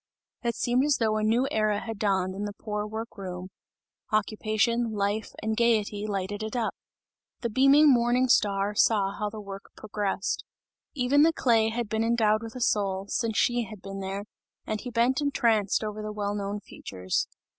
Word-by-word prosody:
It 235 Hz, -1 st, -1 dB
seemed 245 Hz, +2 st, +1 dB
as 290 Hz, -1 st, +3 dB
though 220 Hz, -2 st, +1 dB
a 215 Hz, -, -1 dB
new 235 Hz, +5 st, +2 dB
era 215 Hz, -1 st, +1 dB
had 225 Hz, -2 st, -6 dB
dawned 190 Hz, -3 st, +1 dB
in 200 Hz, +2 st, -4 dB
the 205 Hz, 0 st, -5 dB
poor 210 Hz, -1 st, -3 dB
work 220 Hz, 0 st, -6 dB
room; 185 Hz, -1 st, -6 dB, 0.6 s
occupation, 215 Hz, +2 st, +1 dB
life 205 Hz, +1 st, -1 dB
and 220 Hz, 0 st, 0 dB
gayety, 215 Hz, -3 st, +1 dB
lighted 200 Hz, 0 st, -3 dB
it 220 Hz, +2 st, -4 dB
up. 235 Hz, -3 st, 0 dB, 0.7 s
The 235 Hz, -, -2 dB
beaming 275 Hz, +6 st, +6 dB
morning 240 Hz, +1 st, +3 dB
star 200 Hz, -3 st, +2 dB
saw 205 Hz, -2 st, +3 dB
how 210 Hz, +1 st, -3 dB
the 215 Hz, +1 st, -8 dB
work 195 Hz, -1 st, -8 dB
progressed. 205 Hz, -2 st, -2 dB, 0.5 s
Even 275 Hz, +2 st, +3 dB
the 325 Hz, +2 st, +6 dB
clay 230 Hz, -7 st, +3 dB
had 235 Hz, 0 st, -2 dB
been 220 Hz, +2 st, 0 dB
endowed 225 Hz, -2 st, +2 dB
with 225 Hz, +1 st, -8 dB
a 255 Hz, -, -6 dB
soul, 195 Hz, -4 st, +1 dB
since 225 Hz, -3 st, -1 dB
she 240 Hz, -1 st, +2 dB
had 215 Hz, 0 st, -10 dB
been 195 Hz, 0 st, -7 dB
there, 195 Hz, +1 st, -4 dB, 0.4 s
and 215 Hz, -1 st, -3 dB
he 250 Hz, -, -6 dB
bent 245 Hz, +3 st, +2 dB
entranced 225 Hz, -8 st, +2 dB
over 215 Hz, 0 st, -4 dB
the 215 Hz, 0 st, -4 dB
well 205 Hz, -1 st, -2 dB
known 205 Hz, 0 st, -3 dB
features. 95 Hz, -, -3 dB
215 Hz, 180 wpm, -27 LUFS, 205-235 Hz, 0.7 s, beaming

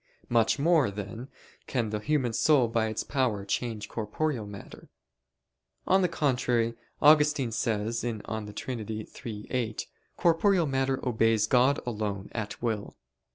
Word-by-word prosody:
Much 115 Hz, +1 st, +3 dB
more, 155 Hz, -4 st, +3 dB
then, 105 Hz, +5 st, -6 dB, 0.4 s
can 115 Hz, -5 st, -1 dB
the 105 Hz, -, -1 dB
human 130 Hz, -1 st, 0 dB
soul 140 Hz, -1 st, +4 dB
by 115 Hz, -1 st, 0 dB
its 110 Hz, -1 st, -2 dB
power 120 Hz, -8 st, -1 dB
change 110 Hz, 0 st, -2 dB
corporeal 115 Hz, +2 st, -2 dB
matter. 100 Hz, -1 st, -11 dB, 1.0 s
On 190 Hz, +1 st, +4 dB
the 180 Hz, -, +3 dB
contrary, 125 Hz, -7 st, +1 dB, 0.3 s
Augustine 150 Hz, -4 st, +5 dB
says 110 Hz, +1 st, -1 dB
(De 110 Hz, -2 st, -4 dB
Trin. 125 Hz, +2 st, -4 dB
iii, 110 Hz, 0 st, -6 dB
8): 115 Hz, -4 st, -2 dB, 0.3 s
"Corporeal 175 Hz, +1 st, +3 dB
matter 135 Hz, -1 st, -1 dB
obeys 115 Hz, -2 st, +3 dB
God 130 Hz, +4 st, +3 dB
alone 105 Hz, -4 st, -3 dB
at 110 Hz, -3 st, -4 dB
will." 110 Hz, -3 st, -2 dB
115 Hz, 130 wpm, -28 LUFS, 110-135 Hz, 1.0 s, Augustine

